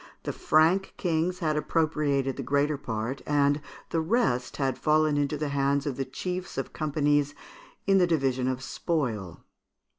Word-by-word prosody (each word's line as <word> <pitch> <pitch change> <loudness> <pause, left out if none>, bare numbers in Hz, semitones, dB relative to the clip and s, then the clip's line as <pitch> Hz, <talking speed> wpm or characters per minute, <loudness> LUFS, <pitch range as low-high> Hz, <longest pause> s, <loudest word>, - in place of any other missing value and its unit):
The - - -3
Frank 165 +5 +3
Kings 175 0 0
had 155 -1 +2
appropriated 150 -4 0
the - - -4
greater 145 +2 +1
part; 120 -1 -4
and 145 0 +2 0.3
the 165 - +1
rest 160 - 0
had 135 -3 -1
fallen 155 -1 +3
into 145 +1 0
the 150 0 -2
hands 140 0 +1
of 140 -3 -2
the 135 - -2
chiefs 180 +7 -5
of 135 - -3
companies 145 -2 +1 0.5
in 195 -1 +4
the 180 - +4
division 135 -6 +1
of 130 0 -2
spoil. 120 - -2
145 Hz, 155 wpm, -27 LUFS, 135-160 Hz, 0.5 s, in